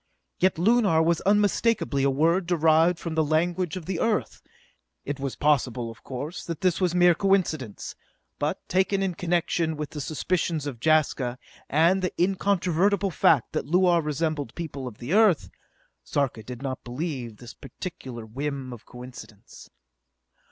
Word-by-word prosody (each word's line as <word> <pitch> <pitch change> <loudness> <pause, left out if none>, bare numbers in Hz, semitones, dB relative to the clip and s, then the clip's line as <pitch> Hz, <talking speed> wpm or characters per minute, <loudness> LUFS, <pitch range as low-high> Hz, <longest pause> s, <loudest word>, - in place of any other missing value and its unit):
Yet 185 -2 +2
Lunar 195 -3 +3
was 170 0 +1
unmistakably 205 -6 +2
a 140 - +3
word 165 +6 +2
derived 165 0 +3
from 165 -1 -5
the 160 0 +2
language 170 +3 0
of 175 - -8
the 185 -1 -3
Earth! 225 -2 -1 0.6
It 145 0 -4
was 135 -1 -3
possible, 125 -5 +1
of 115 - -16
course, 145 +7 -6
that 165 -3 -5
this 185 0 +1
was 180 -1 +1
mere 175 0 +6
coincidence; 165 - 0 0.5
but, - - -2
taken 195 +1 +1
in 190 -2 -1
connection 170 -2 0
with 150 -1 -5
the 150 - -5
suspicions 160 +1 -1
of 135 -5 -5
Jaska, 145 -5 +2 0.3
and 170 +6 +3
the 185 - -2
incontrovertible 195 +1 +1
fact 145 -5 +3
that - - -2
Luar 175 +1 +4
resembled 150 -3 -2
people 140 -6 -5
of 110 -4 -9
the 125 +8 -4
Earth, 210 -7 +4 0.5
Sarka 135 -6 -1
did 125 +4 -9
not 130 -1 -4
believe 130 -1 -4
in 110 - -15
this 120 +2 -11
particular 130 - -8
whim 135 +2 -4
of 120 -1 -13
coincidence. 125 -4 -12
160 Hz, 155 wpm, -26 LUFS, 135-180 Hz, 0.6 s, mere